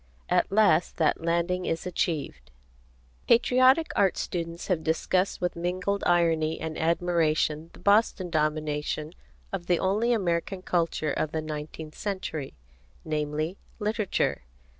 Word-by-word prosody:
At - - +2
last 200 -5 +3
that 160 -1 +2
landing 170 +2 0
is 165 +3 -2
achieved. 160 - -2 0.8
Patriotic 255 +6 +4
art 195 -2 +3
students 170 0 -4
have 175 -5 0
discussed 180 +4 0
with 180 -1 -1
mingled 185 +4 -2
irony 165 -2 +2
and 160 -1 -4
admiration 165 -2 +1
the - - -14
Boston 200 -3 +3
domination 155 0 -1 0.4
of 180 -3 -4
the 175 - +3
only 210 +7 +1
American 185 -3 -1
culture 165 -4 0
of 155 - -1
the 160 - -1
nineteenth 155 0 -6
century, 185 - -4 0.5
namely, 155 +3 -2 0.2
literature. 215 -2 0
170 Hz, 120 wpm, -27 LUFS, 155-190 Hz, 0.8 s, Patriotic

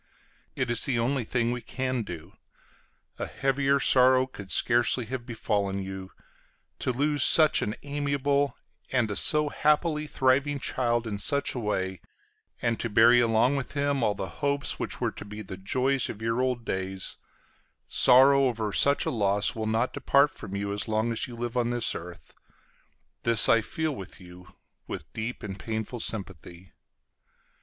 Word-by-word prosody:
It 130 -2 -1
is 120 - +2
the 130 -3 0
only 125 +3 0
thing 120 +1 -1
we 125 0 -4
can 130 -1 -3
do. 85 -7 -8 0.9
A - - -3
heavier 135 +1 +1
sorrow 130 0 +4
could 100 -7 -11
scarcely 120 +2 +2
have 125 +1 -6
befallen 100 -4 -2
you. 95 0 -7 0.7
To - - -1
lose 145 +3 0
such 155 -2 +6
an 105 - -2
amiable 140 0 -1 0.3
and 120 -5 +1
a - - -3
so 150 +5 +3
happily 150 +1 +1
thriving 140 +2 +1
child 120 -3 -1
in 105 -3 -4
such 140 +7 0
a 125 - -4
way, 95 -4 -2 0.6
and 115 -1 0
to 115 - -2
bury 115 +3 +6
along 115 +4 +2
with 135 - -5
him 140 -2 0
all 105 -3 +1
the 95 - -4
hopes 140 -2 -1
which - - -4
were - - -1
to - - -9
be 105 +1 -8
the 95 - -8
joys 130 +8 0
of 105 - -7
your 115 +2 -1
old 125 -2 -1
days, 95 0 -3 0.7
sorrow 135 +2 +5
over 110 -5 -2
such 140 +6 +2
a - - -1
loss 100 -3 +1
will 110 -1 -4
not 115 +3 0
depart 140 +1 +3
from 100 -2 -9
you 100 0 -3
as 100 -1 -3
long 110 +1 0
as 115 - -2
you 120 - -9
live 120 +1 -5
on 120 -1 +1
this 120 -1 +1
earth; 85 +1 -10 0.9
this 115 -2 +4
I 115 - +5
feel 160 +4 -3
with 95 - -10
you, 90 +1 -15 0.3
with - - -8
deep 110 +2 -5
and 100 -2 -6
painful 110 +3 -4
sympathy. 95 -5 -6
120 Hz, 170 wpm, -27 LUFS, 105-135 Hz, 0.9 s, such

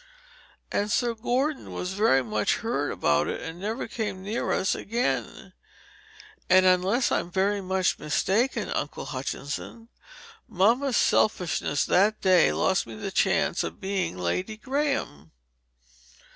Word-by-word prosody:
And 205 +1 0
Sir 240 +1 +1
Gordon 255 +6 -2
was 180 +1 -4
very 190 -10 +3
much 105 -2 0
hurt - - -2
about 75 0 +1
it, - - -3
and 165 +1 -7
never 215 +6 -3
came 205 -5 -4
near 215 +4 -2
us 190 - +1
again. 235 +4 -3 1.0
And 185 0 +6
unless 185 +7 +3
I'm - - 0
very 195 +3 0
much 190 -1 0
mistaken, 215 - 0
Uncle 145 - -3
Hutchinson, 145 - -6 0.6
mamma's 235 +8 +2
selfishness 175 -7 +1
that 205 +4 +3
day 185 -4 +4
lost 190 -8 +1
me 115 - -8
the 110 - -5
chance - - +1
of 85 0 -6
being 190 - -2
Lady 180 - -2
Graham. 260 - -2
190 Hz, 130 wpm, -26 LUFS, 160-225 Hz, 1.0 s, And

